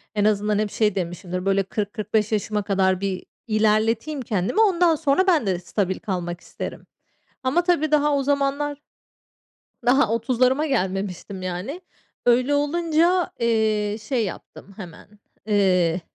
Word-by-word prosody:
en 205 -1 +2
azından 210 0 +1
hep 210 -1 -1
şey 210 -3 +1
demişimdir, 180 0 -4
böyle, 195 0 +2
40-45 210 +2 -2
yaşıma 210 0 0
kadar 190 -2 +1
bir 195 -2 -3 0.2
ilerleteyim 220 +6 +1
kendimi. 210 - 0
Ondan 355 -6 +4
sonra 310 +5 +1
ben 330 - +3
de 185 -3 0
stabil 185 +1 -2
kalmak 175 -4 -4
isterim. - - -7 0.6
Ama 270 +7 +2
tabii 335 -4 +1
daha 295 -1 +3
o 280 - 0
zamanlar 285 +1 0 1.1
daha 250 -2 +4
30'larıma 255 +5 +1
gelmemiştim, 195 - -2
yani. 185 - -5 0.4
Öyle 250 +3 +3
olunca, 335 +4 +1
eee, 215 -2 +1
şey 225 +1 -1
yaptım 195 +1 -9
hemen, 200 +2 -12 0.3
eee, 185 -4 +2
215 Hz, 130 wpm, -23 LUFS, 195-280 Hz, 1.1 s, Ondan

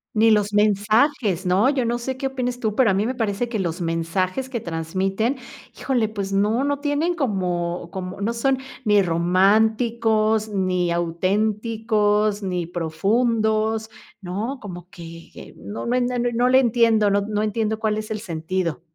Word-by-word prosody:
Ni 225 +1 +5
los 210 -1 +2
mensajes, 210 - +2
¿no? 190 +7 +3
Yo 270 -4 0
no 240 +1 -1
sé 260 +2 -4
qué 270 - -2
opines 250 -2 -3
tú 220 -3 -2
pero 250 -2 +4
a - - +3
mí 200 +2 +1
me 250 - -1
parece 225 -1 -1
que 230 -3 -3
los 170 -1 -2
mensajes 180 +8 -2
que 245 -3 -3
transmiten, 190 - -2 0.4
híjole, 240 -5 0
pues 200 -2 -4
no 210 +6 +2
no 285 0 0
tienen 295 +4 0
como 180 - -2
como 185 0 -6
no 215 +4 -1
son 265 +3 +1 0.3
ni 210 -2 +4
románticos, 215 +5 +2
ni 185 -3 0
auténticos, 210 +4 0
ni 180 -3 -2
profundos, 220 +6 0 0.3
¿no?, 210 +8 -4
como 180 -4 -9
que 165 -1 -12
no 205 - -7
no 240 - 0 0.4
no 245 +2 +2
le 260 +1 +6
entiendo, 230 -4 +3
no 200 0 +2
no 210 +1 -2
entiendo 215 0 -1
cuál 215 -1 0
es 215 0 -5
el 215 - -3
sentido. 170 -3 -3
210 Hz, 160 wpm, -22 LUFS, 185-230 Hz, 0.4 s, le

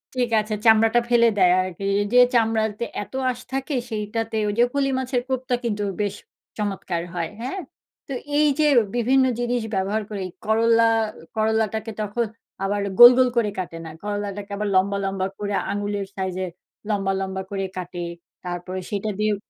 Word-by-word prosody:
ঠিক 245 -2 +1
আছে, 215 0 -5
চামড়াটা 225 +1 +6
ফেলে 235 -1 +5
দেয় 180 -2 +5
আরকি। 185 +1 -5 0.2
এইযে 205 +5 +3
চামড়াতে 220 -1 +1 0.2
এত - - -17 0.2
আঁশ 245 - -3
থাকে, 270 +2 -2 0.2
সেইটাতে 220 +1 -3
ওইযে 235 +4 +3
ফলি 275 -1 +1
মাছের 255 -1 -1
কোপ্তা 255 -1 0
কিন্তু 210 -3 -1 0.2
বেশ 205 -1 -1 0.4
চমৎকার 195 -5 -2
হয়। 165 -2 -2
হ্যাঁ? 270 +10 -3 0.5
তো 275 - -4 0.2
এইযে 300 0 +3 0.3
বিভিন্ন 260 +3 +3 0.2
জিনিস 245 0 0
ব্যবহার 200 +3 0
করে 200 -3 -4 0.2
করল্লা, 230 +1 +4 0.5
করল্লাটাকে 220 0 0
তখন 210 +3 -1 0.4
আবার 200 +1 0 0.2
গোল, 240 0 +13
গোল 255 -1 +5
করে 215 -3 +3
কাটে 170 -2 -5
না। - - -6
করল্লাটাকে 205 -1 -4
আবার 210 0 -1
লম্বা, 200 +2 +3
লম্বা 195 -1 -1
করে, 205 -1 -3 0.2
আঙুলের 205 -1 -2
সাইজের 185 -1 -3 0.4
লম্বা, 195 -2 0
লম্বা 190 0 -3
করে 195 -1 -2
কাটে। 175 -1 -5 0.4
তারপরে 180 +1 -4
সেটা 205 +1 -2
দিয়েও 210 -1 +2
210 Hz, 155 wpm, -23 LUFS, 195-235 Hz, 0.5 s, গোল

